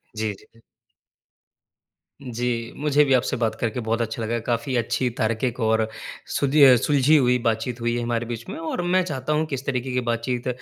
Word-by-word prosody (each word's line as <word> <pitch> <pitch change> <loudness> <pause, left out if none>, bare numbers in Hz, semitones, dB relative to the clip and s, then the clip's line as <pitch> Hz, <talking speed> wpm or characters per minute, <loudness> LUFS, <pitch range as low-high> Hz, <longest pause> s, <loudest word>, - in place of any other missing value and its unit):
जी, 110 -1 -2
जी, - - -17
जी। 115 - -22 1.6
जी, 120 -1 -3
मुझे 150 0 +3
भी 135 - +2
आपसे 130 -1 +1
बात 115 -2 0
करके 115 +1 -1
बहुत 115 0 -1
अच्छा 115 0 -3
लगा। 115 +2 -1
काफ़ी 120 +3 -2
अच्छी, 120 +2 0
तार्किक, 115 +3 -1
और 110 0 +2 0.5
सुदीअ 140 -2 +6
सुलझी 145 +4 +3
हुई 125 -2 +3
बातचीत 115 +2 -1
हुई 120 0 0
है 120 - -2
हमारे 120 0 -1
बीच 115 -1 -6
में। - - -5
और 165 +2 -3
मैं 185 - +4
चाहता 150 -2 -2
हूँ 155 +1 +1
कि 145 - -3
इस 135 +1 -7
तरीके 130 -1 -2
की 125 - +1
बातचीत 120 +2 -2
120 Hz, 190 wpm, -23 LUFS, 115-135 Hz, 1.6 s, सुदीअ